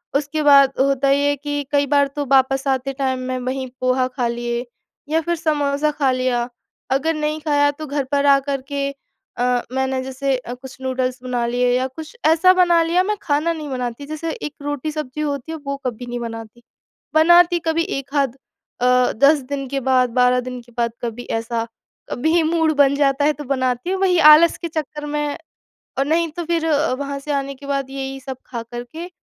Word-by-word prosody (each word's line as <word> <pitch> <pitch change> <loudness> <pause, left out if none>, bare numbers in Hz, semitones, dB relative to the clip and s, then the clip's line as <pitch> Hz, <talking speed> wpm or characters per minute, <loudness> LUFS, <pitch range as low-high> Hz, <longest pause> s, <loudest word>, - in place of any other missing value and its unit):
उसके 295 +2 0
बाद 280 -2 +7
होता 275 0 +2
ये 285 +1 +3
है 285 - +1
कि 290 +1 -3
कई 285 -1 +3
बार 285 0 +3
तो 290 -1 -2
वापस 270 +1 +3
आते 270 0 0
टाइम 265 -1 -1
मैं 255 0 -2
वहीं 260 +1 -3
पोहा 255 0 +2
खा 255 -1 -2
लिए 240 +1 -3 0.4
या 320 +1 +2
फिर 345 +2 -1
समोसा 300 -1 0
खा 280 -3 +1
लिया, 250 -1 0 0.4
अगर 285 +5 +1
नहीं 305 0 -2
खाया 290 -2 +3
तो 305 +2 -8
घर 285 0 -1
पर 285 0 +2
आकर 275 -1 +3
के 280 -1 -1 0.5
अ, 245 0 +1
मैंने 265 0 -1
जैसे 265 +1 -1
अ, 245 -1 -7
कुछ 255 +1 -11
नूडल्स 255 -1 -2
बना 245 -2 -1
लिए 245 +1 +1
या 260 +1 0
कुछ 310 - -10
ऐसा 330 +4 +6
बना 350 -2 +4
लिया, 345 +3 +2
मैं 420 +2 -1
खाना 310 -1 +1
नहीं 305 -3 -6
बनाती 250 +1 -4
जैसे 310 +2 -4
एक 300 - -6
रोटी-सब्जी 290 0 -4
होती 285 0 -3
है 325 - -4
वो 280 0 -3
कभी 245 0 -4
नहीं 245 0 -5
बनाती। 225 0 -8 0.5
बनाती 345 +2 +6
कभी 330 +1 +1 0.2
1 275 +2 -10
आध 275 -3 +1 0.5
अ, 250 0 +4
10 280 +6 +5
दिन 275 -1 -3
के 275 0 -1
बाद 255 -1 +2
12 250 +1 +3
दिन 250 0 -6
के 240 - -20
बाद 235 -1 +1
कभी 240 +1 -4 0.2
ऐसा 230 0 -3 0.4
कभी 320 +6 +2
मूड 320 0 +2
बन 280 -1 +5
जाता 280 0 +2
है 300 - +3
तो 295 - -8
बनाती 255 +1 -1
हूँ, 380 0 -1
वही 365 -2 +3
आलस 305 +2 +7
के 340 - -4
चक्कर 300 -2 -5
में 295 0 -2 0.6
और 275 - +2
नहीं 330 +2 +1
तो 345 +2 -5
फिर 335 -1 0
अ, 300 -3 +2
वहाँ 280 +1 -4
से 295 +2 -5
आने 275 0 -2
के 280 - -13
बाद 275 -1 -2
यही 270 0 -5
सब 265 -1 -7
खा 235 -2 -5
कर 240 +1 -7
के 335 +3 -7
275 Hz, 205 wpm, -20 LUFS, 255-305 Hz, 0.6 s, बाद